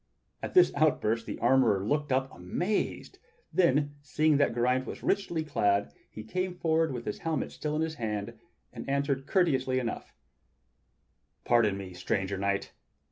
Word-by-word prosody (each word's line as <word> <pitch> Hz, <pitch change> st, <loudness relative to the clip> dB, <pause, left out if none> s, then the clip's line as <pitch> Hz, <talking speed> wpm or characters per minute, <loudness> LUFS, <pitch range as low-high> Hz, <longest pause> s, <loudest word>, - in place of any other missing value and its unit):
At -, -, -6 dB
this 365 Hz, -, +6 dB
outburst 115 Hz, -7 st, +1 dB
the -, -, -4 dB
armorer 120 Hz, -5 st, +3 dB
looked 145 Hz, +4 st, 0 dB
up 130 Hz, +1 st, 0 dB
amazed; 175 Hz, -, -2 dB, 0.3 s
then, 145 Hz, -4 st, +2 dB
seeing 150 Hz, +1 st, +2 dB
that 145 Hz, -, +3 dB
Geraint 125 Hz, +2 st, +1 dB
was -, -, -7 dB
richly 185 Hz, -5 st, 0 dB
clad, 100 Hz, -9 st, +1 dB, 0.2 s
he 110 Hz, -, -9 dB
came 185 Hz, +10 st, -3 dB
forward 160 Hz, -2 st, +1 dB
with 120 Hz, -2 st, -5 dB
his 105 Hz, -, -4 dB
helmet 160 Hz, -1 st, -2 dB
still 150 Hz, 0 st, -3 dB
in 155 Hz, -, +1 dB
his 160 Hz, 0 st, -2 dB
hand, 105 Hz, -2 st, -3 dB, 0.4 s
and -, -, -7 dB
answered 140 Hz, -1 st, 0 dB
courteously 130 Hz, -9 st, +2 dB
enough: 120 Hz, -3 st, -4 dB, 1.3 s
"Pardon 110 Hz, -5 st, +3 dB
me, 95 Hz, -2 st, -7 dB
stranger 95 Hz, +1 st, -2 dB
knight! 100 Hz, 0 st, -1 dB
135 Hz, 150 wpm, -29 LUFS, 110-155 Hz, 1.3 s, this